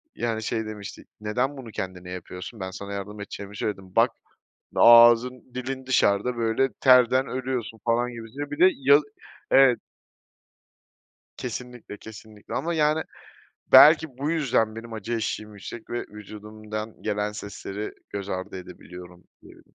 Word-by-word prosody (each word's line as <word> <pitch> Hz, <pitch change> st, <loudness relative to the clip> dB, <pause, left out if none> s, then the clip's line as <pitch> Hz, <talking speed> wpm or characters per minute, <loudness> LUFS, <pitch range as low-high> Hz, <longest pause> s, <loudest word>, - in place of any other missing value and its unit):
yani, 110 Hz, -2 st, -2 dB
şey, 110 Hz, +1 st, -2 dB
demişti 105 Hz, -2 st, -8 dB, 0.2 s
neden 125 Hz, +7 st, -1 dB
bunu 120 Hz, -4 st, -9 dB
kendine 90 Hz, -2 st, -6 dB
yapıyorsun 90 Hz, +4 st, -8 dB
ben 95 Hz, -1 st, -5 dB
sana 100 Hz, +1 st, -7 dB
yardım 100 Hz, +1 st, -6 dB
edeceğimi 100 Hz, 0 st, -8 dB
söyledim 95 Hz, -3 st, -5 dB
bak -, -, +5 dB, 0.7 s
ağzın 120 Hz, +1 st, +6 dB
dilin 130 Hz, +1 st, -5 dB
dışarıda, 120 Hz, -1 st, +2 dB
böyle, 115 Hz, +3 st, +1 dB
terden 130 Hz, 0 st, +5 dB
ölüyorsun, 125 Hz, -4 st, -4 dB
falan, 120 Hz, +1 st, +1 dB
gibisinden 120 Hz, +5 st, -7 dB
bir 145 Hz, -, -6 dB
de 185 Hz, -, +8 dB
yaz 140 Hz, +2 st, +5 dB, 0.5 s
evet. 135 Hz, -3 st, +6 dB, 1.6 s
Kesinlikle, 125 Hz, -3 st, -7 dB
kesinlikle 110 Hz, -1 st, -11 dB
ama, 165 Hz, +5 st, -1 dB
yani, 155 Hz, 0 st, +2 dB, 0.7 s
belki, 155 Hz, -4 st, +7 dB
bu 145 Hz, +3 st, -1 dB
yüzden 120 Hz, -9 st, +1 dB
benim 115 Hz, 0 st, -8 dB
acı 110 Hz, +2 st, -5 dB
eşiğim 110 Hz, -1 st, -3 dB
yüksek 105 Hz, +3 st, -10 dB
ve 120 Hz, -, -2 dB
vücudumdan 105 Hz, +1 st, -8 dB
gelen 105 Hz, -1 st, -1 dB
sesleri 105 Hz, 0 st, -6 dB, 0.2 s
göz 100 Hz, -1 st, -5 dB
ardı 95 Hz, 0 st, -4 dB
edebiliyorum, 90 Hz, -1 st, -12 dB, 0.2 s
diyebilirim. -, -, -18 dB
115 Hz, 135 wpm, -25 LUFS, 105-125 Hz, 1.6 s, de